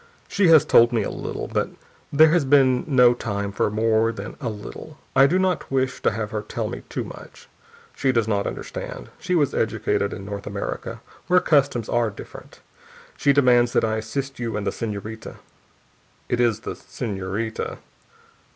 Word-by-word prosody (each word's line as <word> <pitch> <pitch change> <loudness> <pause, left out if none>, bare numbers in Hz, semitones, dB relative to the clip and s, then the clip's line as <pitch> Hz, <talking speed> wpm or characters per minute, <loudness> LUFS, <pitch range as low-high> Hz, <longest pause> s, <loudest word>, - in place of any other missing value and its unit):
"She 200 -2 +2
has 160 -2 +7
told 120 -5 +6
me 115 -3 +1
a - - -3
little, - - -5
but - - -1 0.4
there 155 +2 +6
has 170 -2 +3
been 130 -2 +4
no 125 -4 +5
time 100 -4 -3
for 100 - 0
more 110 +1 +2
than 105 -1 -7
a 120 - -2
little: 110 +8 -9 0.2
I 135 +1 +7
do 175 +6 +2
not 185 -2 0
wish 130 -1 -1
to - - +3
have 105 -1 -4
her 105 - -2
tell 105 - -4
me - - -6
too - - -3
much. - - -12 0.5
She 135 - +1
does 115 -3 +1
not 100 -2 0
understand. - - -6
She 180 - -1
was 145 -6 +2
educated 100 - 0
in 95 - -7
North 100 0 -6
America, 100 -1 -5 0.3
where 180 0 +5
customs 140 - +2
are 120 -2 +1
different. 100 - -12 0.5
She 140 - +3
demands 125 -3 +4
that - - +3
I 110 0 -1
assist 135 +5 -4
you 115 -3 -2
and 105 - -3
the - - 0
senorita 110 0 -6 0.9
it 120 - 0
is 115 -3 +2
the - - -5
senorita?" 105 0 -4
120 Hz, 180 wpm, -23 LUFS, 105-140 Hz, 0.9 s, has